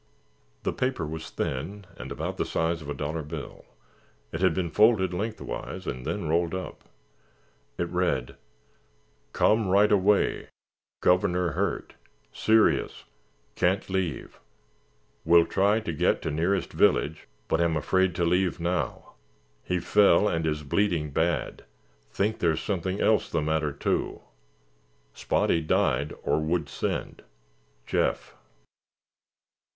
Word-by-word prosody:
The - - -1
paper 125 -10 -1
was 80 +1 -6
thin 95 +10 -4
and - - -8
about - - -4
the - - +1
size 80 0 -1
of 75 - -9
a - - -1
dollar 80 +2 -3
bill; 75 0 -8 0.7
it 80 - -4
had 95 - +3
been 90 -3 -2
folded 105 -3 +4
lengthwise 110 +5 -5
and 65 0 -5
then - - -2
rolled 85 +2 +1
up. 95 - -7 0.9
It 85 - -1
read: 90 -9 -1 1.0
"Come 110 - +2
right 100 +3 +4
away. 100 0 +2 0.5
Governor 90 -1 +2
hurt. - - -2 0.4
Serious. 110 0 +2 0.5
Can't 90 +2 +1
leave. 95 -4 -3 0.8
Will 85 0 +6
try 100 +3 +2
to 85 -6 -4
get - - +1
to 80 - -2
nearest 85 +6 0
village 75 +3 +2 0.2
but 80 - +1
am 85 -2 +2
afraid 95 +4 +1
to 85 - +1
leave 90 +1 +1
now. 85 0 -2 0.5
He 90 -1 -1
fell 105 +1 +4
and 80 -3 0
is 75 -1 -2
bleeding 80 -1 0
bad. 80 0 -1 0.5
Think 105 - -1
there's 80 -2 +1
something 95 0 -2
else 110 -1 +2
the 85 - 0
matter, 80 -1 0
too. 70 - -2 0.9
Spotty 85 - +1
died 75 -1 +1
or 75 +2 +1
would 80 -1 -1
send. - - -3 0.6
Jeff." - - -1
85 Hz, 125 wpm, -27 LUFS, 80-95 Hz, 1.0 s, Will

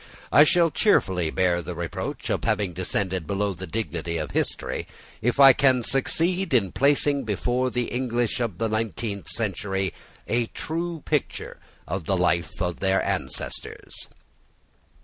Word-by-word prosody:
I 150 - +8
shall 170 +1 +4
cheerfully 95 - +2
bear 90 0 +1
the 90 0 -6
reproach 85 0 -4
of - - -1
having 100 -4 0
descended 95 -1 -2
below 100 0 0
the 95 +1 -7
dignity 85 -4 -3
of 75 - -4
history, - - -2 0.3
if 125 +4 0
I 135 -1 +10
can 130 -2 +3
succeed 165 +6 +1
in 100 -6 +2
placing 140 0 +2
before 120 +4 0
the 125 0 -1
English 120 -2 -1
of 115 -8 -2
the 115 - 0
nineteenth 110 -2 -3
century 95 -3 -1 0.3
a 120 0 +1
true 165 +2 -4
picture - - -2 0.3
of 95 -4 -3
the 95 - +1
life 85 -2 0
of 90 -1 -2
their 95 0 +2
ancestors. 90 -10 -3
105 Hz, 145 wpm, -25 LUFS, 90-130 Hz, 0.3 s, I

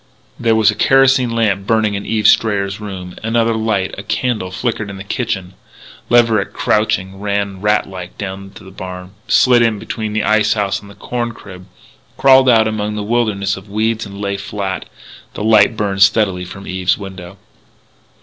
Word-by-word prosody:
There 115 -2 +2
was 110 -1 +4
a - - -7
kerosene 135 -1 +4
lamp 105 -4 0
burning 110 -2 +2
in 100 0 -5
Eve 110 -1 +2
Strayer's 100 -2 +2
rooms. 95 -3 -7
Another 115 +1 +1
light 110 -4 -1
a - - -4
candle 110 -3 -2
flickered 105 +2 -3
in 100 - -8
the 95 - -7
kitchen. 95 -4 -3 0.6
Leverett, 115 -4 +3
crouching, 100 -3 0
ran 100 -1 -2
rat 105 0 +1
like 90 -2 -9
down 95 -1 -6
to - - -12
the 95 - -13
barn, 90 -1 -8 0.2
slid 125 -2 +4
in 115 -2 +2
between 110 +1 -5
the 110 0 0
ice 110 0 +3
house 100 -2 -1
and 100 0 -14
corn 120 -1 -3
crib, 90 -3 -12 0.5
crawled 130 -1 +6
out 110 -2 +5
among 105 -1 -2
the 105 - -3
wilderness 105 -3 0
of 95 +2 -13
weeds 110 +2 -1
and 100 0 -10
lay 100 -1 -2
flat. 100 -1 -4 0.5
The - - -4
light 110 0 +4
burned 100 -2 -2
steadily 95 -2 +3
from 95 +2 -10
Eve's 95 0 0
window. 95 -2 -9
105 Hz, 175 wpm, -17 LUFS, 95-110 Hz, 0.6 s, crawled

